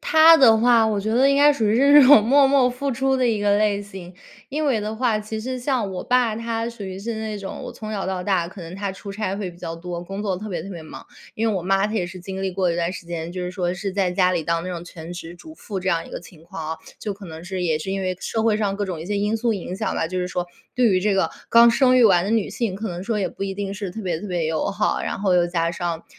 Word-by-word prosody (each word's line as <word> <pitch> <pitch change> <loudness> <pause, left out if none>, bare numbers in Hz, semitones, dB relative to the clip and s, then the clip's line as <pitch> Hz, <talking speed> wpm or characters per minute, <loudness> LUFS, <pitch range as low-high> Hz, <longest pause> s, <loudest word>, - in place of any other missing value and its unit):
她 320 +1 +7
的 230 -6 +6
话 230 -1 +4
我 210 -2 0
觉 215 +2 -2
得 260 +4 +4
应 275 - +3
该 290 +1 +6
属 230 -6 -1
于 210 - +2
是 280 +3 +5
这 290 -3 +9
种 265 -6 +8
默 275 +4 +5
默 270 -2 +4
付 270 +2 -3
出 265 +2 +1
的 255 - +2
一 220 -3 0
个 205 0 +3
类 205 -1 +1
型。 190 -3 -10 0.3
因 300 +3 -2
为 250 -6 +2
的 215 +1 -4
话， 225 -2 +1
其 215 +1 -5
实 255 +2 -4
像 245 -6 -1
我 180 - -5
爸 245 -3 +2
他 230 0 -3
属 230 -4 -8
于 190 0 -6
是 225 +3 -4
那 220 -1 -4
种 195 -1 -7
我 - - -7
从 215 -1 -8
小 195 -2 -3
到 185 -1 -2
大 185 -3 +1
可 185 +2 -11
能 165 +2 -8
他 195 -1 -3
出 200 +1 -9
差 195 -1 -3
会 195 -3 -4
比 175 - -16
较 165 -1 -5
多， 175 +1 -6
工 195 +3 -6
作 195 -3 -1
特 210 +3 -7
别 170 -4 -4
特 195 - -9
别 170 -3 -8
忙。 155 - -11 0.3
因 225 +1 0
为 210 - 0
我 180 - -2
妈 195 +2 +2
她 215 - -5
也 180 -5 0
是 180 0 -9
经 190 +1 -6
历 190 - -1
过 185 -2 +1
一 170 - -2
段 175 +1 -1
时 170 - -8
间， 170 0 -5
就 180 0 -4
是 180 - -3
说 180 -1 -2
是 195 +2 -4
在 190 -2 +1
家 180 0 +2
里 170 -3 0
当 170 +1 0
那 185 - -5
种 175 -1 -6
全 170 0 -9
职 175 -1 -8
主 315 - -13
妇 200 -10 -6
这 185 - -2
样 165 -2 0
一 - - -13
个 - - -6
情 170 -2 -16
况 160 -1 -6
啊。 - - -6 0.2
就 210 - -3
可 200 0 -12
能 160 0 -9
是 185 -1 -4
也 160 -3 +1
是 190 +5 -5
因 195 - -2
为 185 -1 -2
社 225 - -2
会 220 -2 +2
上 200 -2 -1
各 205 - -1
种 180 -4 -5
一 165 - -7
些 205 0 -1
因 210 +2 0
素 230 0 0
影 185 -1 -5
响 215 +3 -2
吧， - - 0
就 185 +2 -4
是 180 0 -2
说 180 -1 -3 0.3
对 250 -1 +3
于 185 -3 +2
这 205 +1 +1
个 190 - +1 0.2
刚 235 0 +7
生 255 +1 +4
育 245 - +6
完 180 -4 +5
的 205 - -2
女 225 -3 +1
性， 225 -6 -2
可 220 +2 -4
能 175 0 -5
说 215 +1 -1
也 185 -3 0
不 195 - -8
一 195 -1 -3
定 200 0 -4
是 200 -3 -5
特 220 - -7
别 170 -3 -2
特 - - -6
别 175 -3 -1
友 160 -1 -1
好。 210 +1 0
然 - - -3
后 190 -3 +2
又 175 -1 +3
加 170 -1 0
上 170 -1 -4
195 Hz, 335 characters per minute, -22 LUFS, 180-225 Hz, 0.3 s, 这